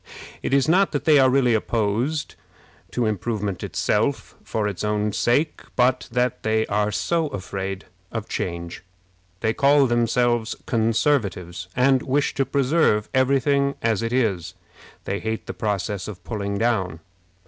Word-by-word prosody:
It - - -3
is 135 +1 +3
not 185 +3 +3
that 145 - -2
they 150 -3 +6
are 130 -1 +5
really 130 -2 +3
opposed 115 +7 -1 0.6
to 125 - -1
improvement 105 -2 -2
itself - - -1
for 105 -2 -1
its 100 -2 -4
own 105 0 0
sake, 140 +9 +1
but 125 +1 +2
that 125 0 0
they 110 0 +1
are 105 +1 0
so 130 - 0
afraid 95 -5 -5 0.3
of 110 -2 -4
change. 85 -1 -4 0.6
They 110 -1 +1
call 140 +2 +4
themselves 120 -1 +1
Conservatives, 110 - 0
and 130 +1 +4
wish 140 +2 0
to 135 - 0
preserve 135 -6 +2
every 130 +1 +3
thing 140 0 +1
as 115 -3 +1
it 115 0 -2
is. 110 -9 0 0.5
They 100 +1 -2
hate 110 0 -3
the - - -5
process 100 -2 -2
of 95 -4 -9
pulling 100 -1 -3
down. 95 -8 0
115 Hz, 150 wpm, -23 LUFS, 100-130 Hz, 0.6 s, they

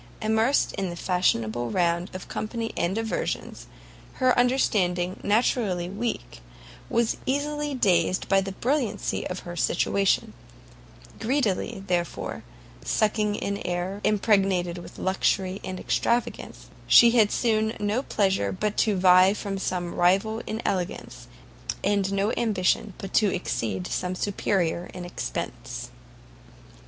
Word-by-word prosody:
Immersed 220 +5 +2
in 195 -2 -2
the 175 - -5
fashionable 120 - 0
round 170 - +1
of 185 - -7
company 225 +1 -4
and 175 +3 0
diversions, 225 0 -3 0.5
her 255 -1 +2
understanding, 185 -8 +1
naturally 205 -5 +1
weak, 230 +4 -4 0.5
was 235 -1 +1
easily 295 +1 -1
dazzled 185 -5 +2
by 195 0 +4
the 195 0 -5
brilliancy 240 -2 -1
of 180 - -5
her 175 0 -8
situation; 195 +3 +1 0.9
greedily, 225 -4 -1
therefore, 175 -2 -2 0.4
sucking 210 -1 +1
in 200 0 -3
air 180 +3 -3
impregnated 195 -4 +2
with - - -11
luxury 190 0 0
and 185 -1 -5
extravagance, 240 +1 -2 0.2
she 235 -1 +8
had 220 -3 +4
soon 220 -2 +1
no 210 +4 0
pleasure 190 - 0
but 210 - -2
to 215 -2 +2
vie 185 +1 +6
with 195 -1 -3
some 175 -2 -2
rival 195 +5 +2
in 220 +2 -4
elegance, 185 -2 -3 0.6
and 200 -1 +1
no 200 +2 +1
ambition 200 -3 +1
but 195 - -8
to 210 -3 +4
exceed 105 - -2
some 180 0 -2
superior 180 -3 -1
in 180 - -6
expence. 175 - -5
195 Hz, 125 wpm, -26 LUFS, 180-220 Hz, 0.9 s, she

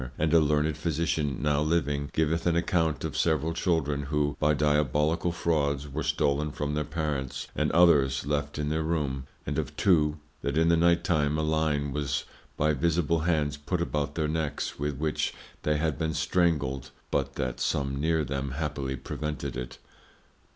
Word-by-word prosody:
And 80 +1 +1
a 85 - +8
learned 75 0 +1
Physician 75 -4 -1
now 75 -1 +2
living, 75 -3 0
giveth 80 +2 0
an 85 - +3
account 85 -3 +1
of - - -3
several 80 0 +1
Children, 80 -4 0
who 75 0 0
by 75 0 +3
Diabolical 75 +3 +2
Frauds 75 -4 0
were 70 - -4
stollen 70 +2 +1
from 75 0 -3
their 75 0 0
Parents, 75 -4 -3
and - - +1
others 70 -6 +4
left 75 0 -1
in 75 0 -1
their 80 +1 0
room: 70 -5 -1 0.2
And - - -1
of - - -5
two, 75 -5 +3 0.2
that 70 +2 -1
in 80 +1 +4
the 85 - +5
night 85 +1 +3
time 75 -4 +1
a 80 - 0
Line 75 -2 0
was 75 -1 -1 0.3
by 75 +1 +3
invisible 85 +2 +1
Hands 80 -3 +1
put 85 +5 -2
about 75 -3 -2
their 80 -2 0
Necks, 75 -3 -2
with 75 -1 -2
which 75 +1 -1 0.3
they 75 0 +1
had 80 0 -1
been 80 -1 -1
strangled, 75 -7 +1 0.2
but - - -1
that 65 -3 -3
some 70 -1 -1
near 80 0 +2
them 70 0 -3
happily 70 -2 -2
prevented 70 -2 -4
it. 60 0 -6
75 Hz, 170 wpm, -28 LUFS, 70-80 Hz, 0.3 s, a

